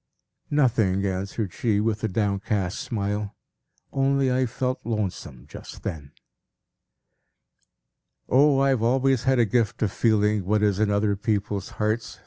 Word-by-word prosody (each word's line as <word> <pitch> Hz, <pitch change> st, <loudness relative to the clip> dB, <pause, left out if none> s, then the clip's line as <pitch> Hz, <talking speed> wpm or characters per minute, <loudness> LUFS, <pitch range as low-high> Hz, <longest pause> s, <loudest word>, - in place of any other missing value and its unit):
"Nothing," 110 Hz, -9 st, +2 dB
answered 95 Hz, +1 st, -3 dB
she, 110 Hz, -4 st, 0 dB
with 110 Hz, 0 st, -1 dB
a -, -, +2 dB
downcast 100 Hz, -2 st, -1 dB
smile. 105 Hz, -5 st, -3 dB, 0.6 s
"Only 135 Hz, -1 st, +2 dB
I 130 Hz, 0 st, +1 dB
felt 130 Hz, +2 st, -2 dB
lonesome 100 Hz, -, -4 dB
just -, -, -11 dB
then." 70 Hz, -3 st, -6 dB, 2.1 s
"O, 140 Hz, +2 st, +4 dB
I 140 Hz, -, +3 dB
have 130 Hz, -4 st, +1 dB
always 130 Hz, +2 st, +2 dB
had 130 Hz, 0 st, +3 dB
a 120 Hz, -, +4 dB
gift 115 Hz, +2 st, 0 dB
of 105 Hz, -, 0 dB
feeling 105 Hz, -2 st, +2 dB
what 105 Hz, +3 st, +1 dB
is 100 Hz, -2 st, +2 dB
in 110 Hz, -1 st, +2 dB
other 100 Hz, 0 st, +1 dB
people's 100 Hz, -1 st, -2 dB
hearts!" 110 Hz, -3 st, -2 dB
105 Hz, 135 wpm, -25 LUFS, 100-125 Hz, 2.1 s, O